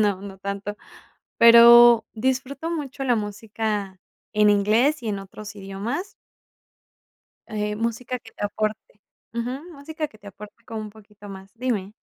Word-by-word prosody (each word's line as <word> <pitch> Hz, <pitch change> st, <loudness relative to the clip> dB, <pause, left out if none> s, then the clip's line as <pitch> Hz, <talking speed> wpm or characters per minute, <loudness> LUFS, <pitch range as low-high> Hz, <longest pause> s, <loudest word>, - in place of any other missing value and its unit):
No, 200 Hz, -3 st, +1 dB
no 195 Hz, -1 st, -9 dB
tanto. 200 Hz, +1 st, -5 dB, 0.6 s
Pero, 235 Hz, 0 st, +8 dB
disfruto 265 Hz, +6 st, -2 dB
mucho 280 Hz, -5 st, -4 dB
la 250 Hz, -2 st, +3 dB
música 210 Hz, -2 st, -4 dB, 0.4 s
en 210 Hz, 0 st, +5 dB
inglés 220 Hz, +8 st, +2 dB
y 230 Hz, -, -4 dB
en 200 Hz, -2 st, -2 dB
otros 205 Hz, +2 st, -10 dB
idiomas. 205 Hz, -, -5 dB, 1.4 s
Eh, 210 Hz, -2 st, -2 dB
música 235 Hz, +3 st, -3 dB
que 225 Hz, -2 st, -16 dB
te -, -, -5 dB
aporte 215 Hz, 0 st, -4 dB, 0.3 s
ujú, 240 Hz, +3 st, -3 dB
música 310 Hz, +1 st, -5 dB
que 215 Hz, -, -20 dB
te 205 Hz, -, -18 dB
aporte 210 Hz, +3 st, -13 dB
como 225 Hz, -1 st, -6 dB
un 215 Hz, -1 st, -7 dB
poquito 210 Hz, -1 st, -15 dB
más, 195 Hz, 0 st, -10 dB
dime. 225 Hz, -5 st, -2 dB
215 Hz, 145 wpm, -23 LUFS, 205-245 Hz, 1.4 s, Pero